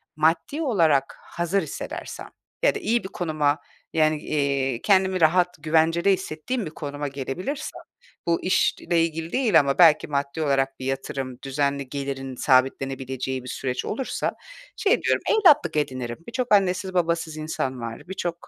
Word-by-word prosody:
maddi 165 Hz, -, +1 dB
olarak 165 Hz, -, +2 dB
hazır 175 Hz, +3 st, -1 dB
hissedersem 155 Hz, -, -6 dB, 0.3 s
ya -, -, +4 dB
da -, -, -2 dB
iyi 235 Hz, +2 st, 0 dB
bir 190 Hz, -, -6 dB
konuma, 155 Hz, -5 st, 0 dB, 0.3 s
yani, 155 Hz, -1 st, +3 dB
iii, 140 Hz, -5 st, 0 dB
kendimi 190 Hz, -2 st, +3 dB
rahat, 175 Hz, +2 st, +4 dB
güvencede 165 Hz, +4 st, +3 dB
hissettiğim 190 Hz, +7 st, -3 dB
bir 155 Hz, -, -6 dB
konuma 145 Hz, -2 st, -5 dB
gelebilirsem, 140 Hz, -, -5 dB, 0.5 s
bu 170 Hz, 0 st, +1 dB
işle 175 Hz, -2 st, +2 dB
ilgili 165 Hz, 0 st, -3 dB
değil 230 Hz, -10 st, +4 dB
ama 140 Hz, -2 st, +1 dB
belki 165 Hz, -4 st, +6 dB
maddi 140 Hz, +1 st, -2 dB
olarak 135 Hz, -2 st, 0 dB
bir 130 Hz, -, -6 dB
yatırım, 135 Hz, -1 st, -3 dB
düzenli 140 Hz, 0 st, -1 dB
gelirin 135 Hz, -1 st, -4 dB
sabitlenebileceği 130 Hz, 0 st, 0 dB
bir -, -, -10 dB
süreç 130 Hz, 0 st, -3 dB
olursa 255 Hz, +4 st, -2 dB, 0.4 s
şey 400 Hz, -, +2 dB
diyorum, -, -, +1 dB
evlatlık 340 Hz, -, +5 dB
edinirim. 130 Hz, -5 st, -2 dB
Birçok 240 Hz, 0 st, -1 dB
annesiz 190 Hz, -1 st, +2 dB
babasız 170 Hz, -3 st, 0 dB
insan 135 Hz, -5 st, -3 dB
var. 115 Hz, +7 st, -7 dB
Birçok, 175 Hz, -2 st, -4 dB
155 Hz, 145 wpm, -24 LUFS, 135-180 Hz, 0.5 s, belki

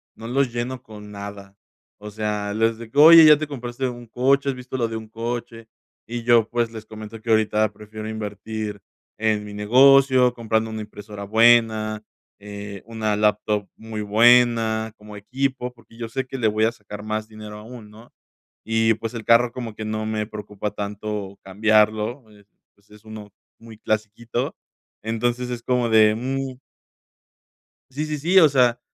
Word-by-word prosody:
no 115 Hz, -, -9 dB
los 130 Hz, +1 st, 0 dB
lleno 125 Hz, +1 st, -4 dB
con 105 Hz, -2 st, -12 dB
nada. 100 Hz, -1 st, -9 dB, 0.4 s
O 105 Hz, 0 st, -10 dB
sea, 105 Hz, -1 st, -3 dB
les 115 Hz, +1 st, +1 dB
de 115 Hz, -1 st, -11 dB
que: 140 Hz, -, -9 dB
"¿Oye, 155 Hz, -1 st, +9 dB
te 155 Hz, -, -4 dB
compraste 130 Hz, -2 st, -4 dB
un 120 Hz, -1 st, -8 dB
coche? 135 Hz, +4 st, +1 dB
¿Has 135 Hz, -, -2 dB
visto 125 Hz, +1 st, -8 dB
lo 115 Hz, -2 st, 0 dB
de 115 Hz, -, -4 dB
un 110 Hz, 0 st, -9 dB
coche?". 115 Hz, 0 st, -6 dB, 0.4 s
Y 120 Hz, 0 st, -5 dB
yo, 115 Hz, -2 st, +4 dB
pues, 120 Hz, -1 st, -1 dB
les 110 Hz, -1 st, -9 dB
comento 110 Hz, 0 st, -10 dB
que 115 Hz, -, -8 dB
ahorita 110 Hz, -1 st, +2 dB
prefiero 110 Hz, +1 st, -9 dB
invertir 105 Hz, -1 st, -5 dB, 0.4 s
en 105 Hz, -1 st, 0 dB
mi 105 Hz, -, -9 dB
negocio, 130 Hz, +4 st, +5 dB
comprando 110 Hz, -2 st, -1 dB
una 110 Hz, -1 st, -5 dB
impresora 105 Hz, -1 st, -9 dB
buena, 110 Hz, 0 st, +3 dB, 0.4 s
eh, 100 Hz, -1 st, -9 dB
una 110 Hz, -2 st, -2 dB
laptop 105 Hz, -1 st, 0 dB
muy 110 Hz, -1 st, -6 dB
buena 110 Hz, 0 st, +3 dB
como 105 Hz, 0 st, -12 dB
equipo, 130 Hz, +3 st, -3 dB
porque 115 Hz, -1 st, -20 dB
yo 115 Hz, -1 st, -6 dB
sé 130 Hz, +2 st, -3 dB
que 135 Hz, -, -6 dB
le 115 Hz, -, +1 dB
voy 110 Hz, +1 st, +1 dB
a 115 Hz, -, 0 dB
sacar 105 Hz, -2 st, -10 dB
más 110 Hz, 0 st, -4 dB
dinero 105 Hz, -1 st, -10 dB
aún, 110 Hz, 0 st, -11 dB
¿no? 110 Hz, +3 st, -16 dB, 0.5 s
Y 115 Hz, 0 st, +2 dB
pues 115 Hz, +2 st, -6 dB
el 115 Hz, -2 st, -6 dB
carro 115 Hz, +2 st, +4 dB
como 120 Hz, -4 st, -6 dB
que 110 Hz, -, -7 dB
no 110 Hz, 0 st, -3 dB
me 110 Hz, -1 st, -2 dB
preocupa 105 Hz, -1 st, -6 dB
tanto 105 Hz, -1 st, -5 dB
cambiarlo, 110 Hz, +4 st, +1 dB
eh, 105 Hz, -1 st, -20 dB, 0.3 s
pues 100 Hz, +1 st, -32 dB
es 105 Hz, +1 st, -17 dB
uno 110 Hz, -1 st, -10 dB, 0.3 s
muy 115 Hz, -1 st, -13 dB
clasiquito. 110 Hz, +2 st, -3 dB, 0.5 s
Entonces, 120 Hz, +3 st, -2 dB
es 120 Hz, -1 st, -5 dB
como 125 Hz, -2 st, 0 dB
de: 110 Hz, -1 st, +5 dB
"Mm". 130 Hz, +2 st, -4 dB, 1.3 s
Sí, 145 Hz, +4 st, -3 dB
sí, 155 Hz, 0 st, -3 dB
sí. 175 Hz, +6 st, +1 dB
O 160 Hz, -4 st, +6 dB
sea, 125 Hz, -3 st, +3 dB
110 Hz, 170 wpm, -22 LUFS, 105-120 Hz, 1.3 s, Oye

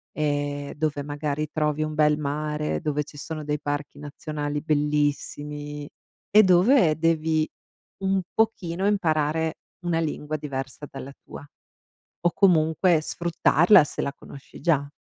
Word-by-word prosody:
Ehm, 145 Hz, -1 st, -2 dB
dove 150 Hz, -1 st, -2 dB
magari 145 Hz, +1 st, -3 dB
trovi 150 Hz, -1 st, 0 dB
un 155 Hz, 0 st, -3 dB
bel 150 Hz, -1 st, +3 dB
mare, 150 Hz, +1 st, -2 dB
dove 150 Hz, -2 st, -1 dB
ci 145 Hz, 0 st, -14 dB
sono 155 Hz, +1 st, -6 dB
dei 150 Hz, 0 st, -2 dB
parchi 145 Hz, 0 st, -4 dB
nazionali 150 Hz, 0 st, -4 dB
bellissimi, 145 Hz, -1 st, -1 dB, 0.4 s
e 215 Hz, +1 st, +8 dB
dove 185 Hz, -, +5 dB
devi 160 Hz, -1 st, +1 dB, 0.6 s
un 190 Hz, 0 st, +2 dB
pochino 195 Hz, -4 st, 0 dB
imparare 160 Hz, -5 st, +1 dB, 0.3 s
una 170 Hz, -1 st, +1 dB
lingua 155 Hz, -1 st, -3 dB
diversa 140 Hz, -1 st, -6 dB
dalla 135 Hz, 0 st, -8 dB
tua, -, -, -10 dB, 0.8 s
o 175 Hz, -, +5 dB
comunque 165 Hz, -2 st, +4 dB
sfruttarla 170 Hz, +2 st, +4 dB
se 145 Hz, -, -4 dB
la 140 Hz, -, -2 dB
conosci 140 Hz, -1 st, -13 dB
già. 145 Hz, -5 st, +1 dB
150 Hz, 130 wpm, -25 LUFS, 145-165 Hz, 0.8 s, e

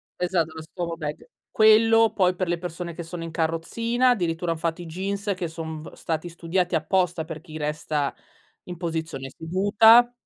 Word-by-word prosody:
Esatto, 175 Hz, -3 st, 0 dB
lo 160 Hz, -, -6 dB
Stoma 170 Hz, +1 st, -5 dB
Bag. 150 Hz, -, -6 dB, 0.2 s
Quello 225 Hz, +1 st, +6 dB
poi 185 Hz, -2 st, +2 dB
per 185 Hz, 0 st, -2 dB
le 175 Hz, 0 st, 0 dB
persone 175 Hz, 0 st, -6 dB
che 170 Hz, -, -6 dB
sono 165 Hz, 0 st, -7 dB
in 165 Hz, -, -6 dB
carrozzina, 230 Hz, +11 st, 0 dB
addirittura 175 Hz, -6 st, 0 dB
han 165 Hz, -, -2 dB
fatto 165 Hz, +2 st, -2 dB
i 175 Hz, -, -8 dB
jeans 200 Hz, +4 st, -2 dB
che 180 Hz, -2 st, -3 dB
son 160 Hz, -1 st, -6 dB
v 160 Hz, -, -10 dB
stati 165 Hz, +1 st, -3 dB
studiati 175 Hz, +1 st, -1 dB
apposta 175 Hz, +1 st, +1 dB
per 160 Hz, -2 st, -7 dB
chi 155 Hz, 0 st, -9 dB
resta 150 Hz, -1 st, -2 dB, 0.5 s
in 180 Hz, -2 st, -8 dB
posizione 160 Hz, -5 st, -4 dB
seduta. 210 Hz, +8 st, +5 dB
170 Hz, 175 wpm, -25 LUFS, 160-190 Hz, 0.5 s, Quello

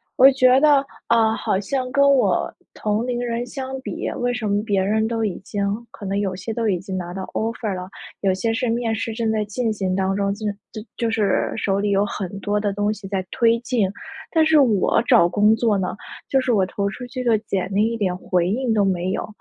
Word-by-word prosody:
我 270 Hz, 0 st, +8 dB
觉 255 Hz, -1 st, +5 dB
得， 290 Hz, -2 st, +5 dB, 0.2 s
啊， 225 Hz, -1 st, +3 dB
好 190 Hz, -, -1 dB
像 255 Hz, +5 st, -2 dB
跟 280 Hz, +1 st, +4 dB
我 275 Hz, -2 st, +2 dB, 0.2 s
同 215 Hz, +2 st, -1 dB
龄 245 Hz, -1 st, -2 dB
人 240 Hz, 0 st, -2 dB
相 265 Hz, +1 st, -6 dB
比， -, -, -4 dB
为 245 Hz, 0 st, 0 dB
什 240 Hz, -3 st, -3 dB
么 205 Hz, +1 st, +1 dB
别 200 Hz, -3 st, +1 dB
人 215 Hz, +3 st, +1 dB
都 225 Hz, 0 st, -1 dB
已 200 Hz, -, -2 dB
经 200 Hz, +1 st, -4 dB, 0.3 s
可 205 Hz, -, -10 dB
能 195 Hz, +1 st, -1 dB
有 200 Hz, -2 st, -1 dB
些 220 Hz, +4 st, -5 dB
都 230 Hz, -1 st, -1 dB
已 180 Hz, -3 st, 0 dB
经 190 Hz, 0 st, -5 dB
拿 175 Hz, -1 st, -5 dB
到 190 Hz, 0 st, -5 dB
Offer 225 Hz, -3 st, -2 dB
了， 180 Hz, 0 st, -6 dB, 0.3 s
有 195 Hz, -2 st, +2 dB
些 225 Hz, +5 st, -1 dB
是 250 Hz, +1 st, -1 dB
面 230 Hz, -1 st, 0 dB
试 225 Hz, +1 st, -3 dB
正 225 Hz, 0 st, -1 dB
在 215 Hz, -1 st, 0 dB
进 225 Hz, +2 st, -2 dB
行 190 Hz, -3 st, -2 dB
当 190 Hz, 0 st, 0 dB
中， 200 Hz, 0 st, 0 dB
就 215 Hz, +2 st, -7 dB, 0.3 s
就 215 Hz, -, -7 dB, 0.2 s
就 230 Hz, -2 st, 0 dB
是 215 Hz, -3 st, +1 dB
手 195 Hz, -1 st, 0 dB
里 205 Hz, 0 st, 0 dB
有 200 Hz, +1 st, +3 dB
很 200 Hz, -1 st, -5 dB
多 205 Hz, +1 st, -1 dB
的 205 Hz, -1 st, -1 dB
东 205 Hz, +1 st, 0 dB
西 210 Hz, -1 st, -7 dB
在 190 Hz, -2 st, -1 dB
推 230 Hz, 0 st, +3 dB
进， 235 Hz, -4 st, 0 dB, 0.4 s
但 320 Hz, -2 st, +4 dB
是 315 Hz, -1 st, +5 dB
我 225 Hz, -5 st, +3 dB
找 230 Hz, -10 st, +6 dB
工 210 Hz, +4 st, +4 dB
作 225 Hz, -3 st, +1 dB
呢， 185 Hz, +1 st, -2 dB, 0.3 s
就 270 Hz, -, +3 dB
是 255 Hz, -2 st, +1 dB
我 195 Hz, -4 st, +3 dB
投 200 Hz, +1 st, -2 dB
出 250 Hz, +4 st, -7 dB
去 255 Hz, +1 st, -5 dB
的 230 Hz, -3 st, +3 dB
简 190 Hz, -3 st, -3 dB
历 215 Hz, +3 st, +2 dB
一 230 Hz, -, -3 dB
点 190 Hz, -4 st, 0 dB
回 180 Hz, -1 st, 0 dB
应 235 Hz, +2 st, 0 dB
都 205 Hz, -2 st, +3 dB
没 185 Hz, -1 st, 0 dB
有。 -, -, -3 dB
215 Hz, 265 characters per minute, -22 LUFS, 195-240 Hz, 0.4 s, 我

